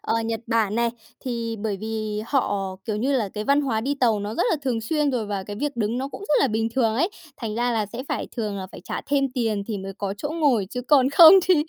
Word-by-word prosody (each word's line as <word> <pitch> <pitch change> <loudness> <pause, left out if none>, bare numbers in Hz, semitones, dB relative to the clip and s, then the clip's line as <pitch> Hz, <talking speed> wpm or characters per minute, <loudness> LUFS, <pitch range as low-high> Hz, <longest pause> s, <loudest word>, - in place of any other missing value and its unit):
ờ, - - -1
Nhật 225 -1 -2
Bản 220 -2 +1
này. 235 0 +1 0.3
Thì 235 -3 -3
bởi 210 -1 -2
vì 215 -1 -3
họ 200 -8 -1
kiểu 215 -2 -2
như 260 +6 0
là 220 -5 0
cái 210 - -3
văn 280 +3 +3
hóa 240 -6 0
đi 275 +5 -1
tàu 225 -5 +3
nó 205 +2 -4
rất - - +1
là - - +2
thường 245 -4 -1
xuyên 295 +5 0
rồi, 235 -4 -2
và 200 -2 -3
cái 205 +1 -7
việc 290 +4 -3
đứng 230 +2 -1
nó 270 +1 -3
cũng - - -9
rất 300 - +3
là 275 - +3
bình 225 +1 0
thường 230 -4 +2
ấy, 340 - +1 0.3
thành 220 -3 -4
ra 240 +1 0
là 215 -2 0
sẽ 235 +5 -6
phải - - -2
thường 210 -3 -2
là 190 - -5
phải - - -9
trả - - -4
thêm 285 -1 +2
tiền 220 -5 0
thì 215 -3 -3
mới 195 0 -6
có 200 -1 -2
chỗ 290 - -3
ngồi 285 - +2
chứ 250 - -3
còn 265 0 +4
không 325 +3 +10
thì 370 - +4
230 Hz, 270 wpm, -24 LUFS, 210-270 Hz, 0.3 s, không